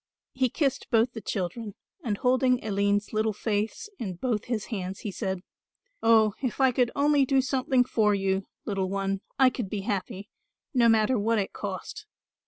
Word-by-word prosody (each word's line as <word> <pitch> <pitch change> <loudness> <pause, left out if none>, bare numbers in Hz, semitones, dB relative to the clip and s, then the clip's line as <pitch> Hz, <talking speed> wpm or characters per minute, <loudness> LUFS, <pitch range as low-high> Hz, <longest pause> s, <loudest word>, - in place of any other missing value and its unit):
He 255 -1 +1
kissed 275 0 -1
both 235 +1 +3
the 225 - -6
children, 205 +2 -4 0.3
and 215 -5 -1
holding 255 0 +2
Aline's 205 0 0
little 215 0 +1
face 215 - -2
in 190 -6 -4
both 225 +2 -2
his 230 -4 -2
hands 190 -1 -4
he 210 - -4
said, 190 0 -3 0.6
"Oh, 220 -2 +5
if 255 -2 -2
I 265 -1 +5
could 245 -1 +2
only 285 0 +4
do 270 0 +3
something 260 -1 +2
for 215 -4 +2
you, 195 0 -1 0.2
little 195 -3 -1
one, 195 0 -1 0.2
I 265 -2 +5
could 235 -7 -4
be 205 0 -3
happy, 200 -1 -3 0.5
no 240 -3 +5
matter 225 +2 +3
what 225 +2 +1
it 195 -2 -2
cost. 205 - -6
220 Hz, 175 wpm, -27 LUFS, 200-255 Hz, 0.6 s, Oh